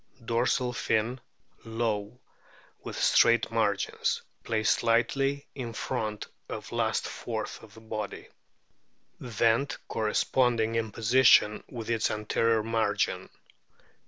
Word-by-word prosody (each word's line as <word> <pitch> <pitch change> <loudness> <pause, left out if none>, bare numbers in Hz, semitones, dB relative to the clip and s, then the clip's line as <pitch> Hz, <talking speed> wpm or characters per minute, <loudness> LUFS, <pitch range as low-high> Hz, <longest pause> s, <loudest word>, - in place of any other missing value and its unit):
Dorsal 125 +1 +1
fin 120 +2 -1 0.4
low 110 0 -2 0.6
with - - -6
straight 115 -1 +4
margins; 105 -3 0 0.2
placed 110 -2 +1
slightly 135 +5 +1
in 120 -4 -6
front 110 -1 -3 0.2
of - - -6
last - - 0
fourth - - -5
of - - -15
body. 110 -2 -5 0.9
Vent 115 +3 +1
corresponding 115 +1 +1
in 115 -1 -1
position 115 -1 +4
with 115 -3 -7
its 115 -2 +1
anterior 110 +1 +1
margin. 115 0 0
115 Hz, 100 wpm, -28 LUFS, 110-120 Hz, 0.9 s, straight